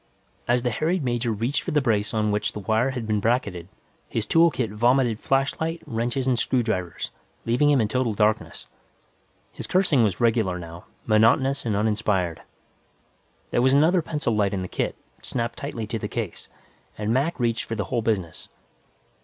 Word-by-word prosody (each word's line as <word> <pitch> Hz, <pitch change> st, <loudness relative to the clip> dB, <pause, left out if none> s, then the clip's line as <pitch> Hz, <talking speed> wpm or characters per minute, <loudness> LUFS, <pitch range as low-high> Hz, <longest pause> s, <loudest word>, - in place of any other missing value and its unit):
As 120 Hz, 0 st, +2 dB
the 125 Hz, -, 0 dB
harried 160 Hz, +7 st, 0 dB
major 120 Hz, -2 st, 0 dB
reached 115 Hz, +7 st, -1 dB
for -, -, -5 dB
the 150 Hz, -, +2 dB
brace 110 Hz, -5 st, 0 dB
on 105 Hz, -2 st, 0 dB
which 105 Hz, 0 st, -1 dB
the -, -, -5 dB
wire 110 Hz, +5 st, +1 dB
had 125 Hz, -4 st, -4 dB
been 110 Hz, -1 st, 0 dB
bracketed, 100 Hz, -6 st, -1 dB, 0.4 s
his 110 Hz, -, -2 dB
tool 165 Hz, +9 st, +5 dB
kit 120 Hz, -8 st, -2 dB
vomited 120 Hz, +1 st, +2 dB
flashlight, 145 Hz, +5 st, -1 dB
wrenches 120 Hz, +3 st, -2 dB
and 125 Hz, -3 st, +2 dB
screwdrivers, 110 Hz, -11 st, -1 dB, 0.3 s
leaving 125 Hz, +6 st, +3 dB
him 145 Hz, -2 st, +4 dB
in 110 Hz, -, +2 dB
total 120 Hz, -1 st, 0 dB
darkness. 105 Hz, +1 st, 0 dB, 0.9 s
His -, -, -8 dB
cursing 180 Hz, -8 st, +3 dB
was 100 Hz, -4 st, 0 dB
regular, 110 Hz, -6 st, +2 dB
now, 85 Hz, 0 st, -9 dB, 0.2 s
monotonous 115 Hz, +5 st, +3 dB
and 105 Hz, -, 0 dB
uninspired. 105 Hz, -5 st, 0 dB, 1.1 s
There 120 Hz, -, +2 dB
was 130 Hz, +2 st, +4 dB
another 165 Hz, +5 st, +4 dB
pencil 150 Hz, -8 st, -2 dB
light 100 Hz, -1 st, +1 dB
in 95 Hz, -, -2 dB
the -, -, -4 dB
kit, -, -, -2 dB, 0.3 s
snapped 120 Hz, -1 st, -3 dB
tightly 125 Hz, -6 st, -4 dB
to 115 Hz, +1 st, -4 dB
the -, -, -3 dB
case, -, -, -5 dB, 0.5 s
and 105 Hz, +1 st, -1 dB
Mac 140 Hz, +6 st, 0 dB
reached 115 Hz, -2 st, 0 dB
for 115 Hz, -, -4 dB
the 105 Hz, -, -1 dB
whole 120 Hz, -3 st, -1 dB
business. 100 Hz, -7 st, -2 dB
115 Hz, 175 wpm, -24 LUFS, 105-130 Hz, 1.1 s, tool